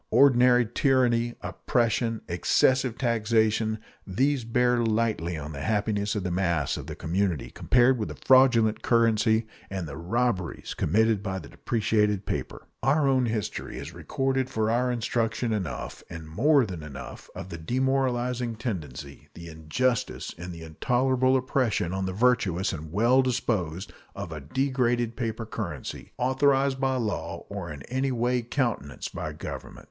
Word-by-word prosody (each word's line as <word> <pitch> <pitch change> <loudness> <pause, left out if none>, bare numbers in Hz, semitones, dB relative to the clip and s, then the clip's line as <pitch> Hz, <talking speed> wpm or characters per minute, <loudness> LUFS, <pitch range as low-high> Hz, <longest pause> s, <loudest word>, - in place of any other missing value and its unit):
Ordinary 125 -2 +5
tyranny, 120 -1 +2
oppression, 115 -1 0
excessive 125 +8 +2
taxation 110 -2 +1 0.3
these 130 +7 +1
bear 120 +1 +2
lightly 110 -7 0
on 75 0 -6
the 70 -2 -6
happiness 105 0 0
of 105 - -2
the 90 - -2
mass 85 -6 0
of - - -7
the - - -6
community 90 -2 -1
compared 125 0 +3
with 105 - -2
a - - -7
fraudulent 125 -4 +4
currency 115 -1 +3 0.2
and 95 -3 -4
the 75 - -7
robberies 95 +1 -1
committed 110 +4 +2
by 95 -2 -3
depreciated 105 +3 0
paper. - - -4 0.2
Our 140 +1 +3
own 130 -2 +3
history 110 -2 -3
has 85 - -7
recorded 130 - -1
for 110 0 0
our 125 +2 +1
instruction 115 -1 -1
enough, 95 -7 -4
and 80 -1 -8
more 135 - +3
than 90 -6 -6
enough, 75 -3 -9
of 95 - -7
the 85 -2 -7
demoralizing 125 +2 0
tendency, 75 - -6
the 85 0 -9
injustice, 80 +11 -1
and 90 +2 -7
the 85 -1 -9
intolerable 130 +10 +2
oppression 125 - 0
on 95 0 -1
the - - -2
virtuous 100 -4 +2
and 80 0 -7
well 120 +8 +4
disposed 105 -8 -1 0.2
of 95 -4 -6
a 75 -2 -6
degraded 120 - 0
paper 115 -2 -3
currency 90 - -6
authorized 135 +1 +2
by 135 0 +1
law 115 -5 -3
or - - -5
in 70 -2 -8
any 130 +2 -1
way 125 0 +1
countenanced 120 - -2
by - - -4
government. - - -7
115 Hz, 145 wpm, -27 LUFS, 95-125 Hz, 0.3 s, Ordinary